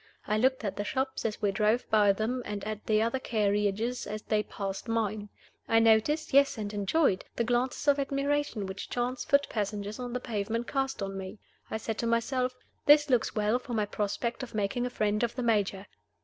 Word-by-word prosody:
I 210 - 0
looked 260 +3 +2
at 200 - -3
the 205 - -1
shops 265 +4 -2
as 215 -1 -3
we 205 - +3
drove 215 +4 +1
by 210 -2 +5
them, 220 +5 -1
and 205 -2 -5
at 215 0 -5
the 215 0 +3
other 230 +3 0
carriages 210 +1 0
as 215 +1 -5
they 215 -1 +1
passed 195 0 -5
mine. 215 -2 -1 0.4
I 225 - +3
noticed 225 +8 +3
yes, 280 -2 +5
and 210 -1 -4
enjoyed 205 - +2
the 235 - +1
glances 245 +4 0
of 285 0 +5
admiration 275 -5 -1
which 190 0 -6
chance 245 +1 -2
foot 280 0 +3
passengers 210 0 -3
on 245 -1 -5
the 250 - -1
pavement 230 0 -2
cast 270 -5 -2
on 195 0 -4
me. 190 +3 -7 0.3
I - - -2
said 220 0 -4
to 235 - 0
myself, 250 +2 0 0.3
"This 295 -1 +6
looks 245 -3 +2
well 215 +3 +2
for 245 -1 -5
my 210 -1 +1
prospect 210 +4 -2
of 255 -4 -7
making 215 +4 0
a - - -4
friend 210 -3 0
of 235 -1 -1
the 250 - -2
Major!" 205 -4 +1
225 Hz, 205 wpm, -29 LUFS, 210-250 Hz, 0.4 s, This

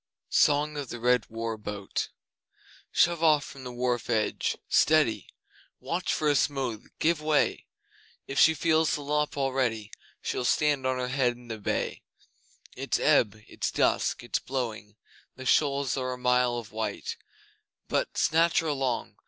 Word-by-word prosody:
Song 150 +1 +3
of 140 -4 -5
the 120 - -6
Red 125 +1 +2
War 115 -1 -4
Boat 105 -2 -4 0.8
Shove 170 -1 +3
off 155 -3 +4
from 135 - -10
the 125 - -6
wharf 120 -1 -2
edge! 110 -3 0
Steady! 155 -8 +3 0.5
Watch 180 +2 -2
for 155 - 0
a 145 - +4
smooth! 135 -6 -1
Give 165 -1 +1
way! 155 -1 +1 0.6
If 135 - -2
she 160 - +6
feels 160 0 +2
the 145 - -6
lop 150 +1 -1
already 130 -6 -1 0.3
She'll - - -3
stand 145 0 +2
on 130 0 0
her 125 0 -2
head 130 -2 +1
in 120 0 -16
the 110 -1 -5
bay. 100 - -2 0.7
It's - - -1
ebb 110 -2 +3
it's - - -3
dusk - - +1
it's - - -1
blowing, 115 -5 -4 0.4
The 130 - -9
shoals 140 -1 +2
are 130 -1 -2
a - - -7
mile 125 -1 +2
of 115 -3 -7
white, 110 - -4 0.7
But - - -1
(snatch 165 +1 +3
her 165 - -4
along!) 135 -5 -2
130 Hz, 155 wpm, -28 LUFS, 120-150 Hz, 0.8 s, she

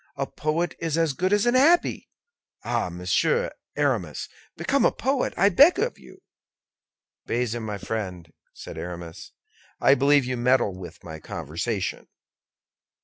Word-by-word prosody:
A 140 - -2
poet 155 +4 -2
is 165 -1 -1
as 165 -3 +2
good 185 +7 -1
as 205 +1 +3
an 240 - +3
abbé. 305 +7 +3 0.6
Ah! 120 -5 -1
Monsieur 90 +1 0 0.2
Aramis, 120 - -1 0.3
become 265 - +1
a - - +5
poet, 265 +2 -1
I 200 - +5
beg 285 - +6
of 470 +5 -1
you." - - -16 1.0
"Bazin, 120 -1 -1
my 105 -2 -4
friend," 90 -7 -5 0.2
said - - -9
Aramis, 85 -1 -8 0.5
"I 135 - +5
believe 140 0 +4
you 125 0 -2
meddle 120 -4 +2
with 90 -1 -10
my 80 -2 -8
conversation." - - -4
130 Hz, 140 wpm, -25 LUFS, -, 1.0 s, beg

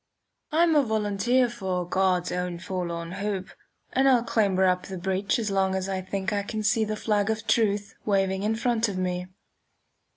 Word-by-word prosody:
I'm 325 +1 +4
a 295 - +6
volunteer 220 +2 +1
for 190 -7 -3
"God's 185 -1 +1
own 180 -1 -2
forlorn 170 -2 -4
hope," 195 0 -3 0.4
and 270 +1 +4
I'll 245 -3 +4
clamber 200 -5 +2
up 180 0 +1
the 190 - -6
breech 190 +5 0
as 220 -4 -2
long 190 -1 +1
as 190 0 -2
I 190 -1 -2
think 195 +2 -3
I 205 - +1
can 215 +2 -4
see 220 +1 +3
the 215 0 -2
flag 210 -1 0
of 220 0 -2
truth 210 -2 +1
waving 195 -2 +1
in 215 +2 0
front 230 -1 +1
of 195 - -4
me. 180 -1 -2
200 Hz, 185 wpm, -26 LUFS, 185-220 Hz, 0.4 s, a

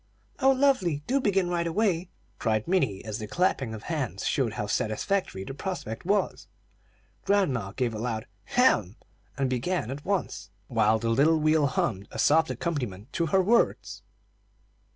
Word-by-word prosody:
"Oh, 265 -1 +4
lovely! 255 - +2
Do 270 +2 +1
begin 195 -5 +2
right 170 -1 -1
away," 180 -1 0 0.3
cried 110 -2 0
Minnie, 135 - 0
as 110 -1 -4
the 110 - -5
clapping 135 - 0
of 110 - -9
hands 130 - -3
showed 125 -6 0
how 105 - -3
satisfactory 110 - -1
the 135 - -7
prospect 160 - -5
was. 205 +1 0 0.8
Grandma 135 - +1
gave 120 -2 -1
a 110 - -5
loud 110 -2 -3 0.2
"hem!" 110 - +2 0.4
and 135 -1 +1
began 130 +2 -1
at 140 +2 -6
once, 195 - -2 0.2
while 110 -2 +3
the 115 +1 -2
little 145 +8 +4
wheel 155 -1 +3
hummed 100 -6 -1
a - - -9
soft 160 +2 +4
accompaniment 125 - -4
to 170 - 0
her 190 +4 +3
words. 230 +5 +1
145 Hz, 155 wpm, -27 LUFS, 110-185 Hz, 0.8 s, Oh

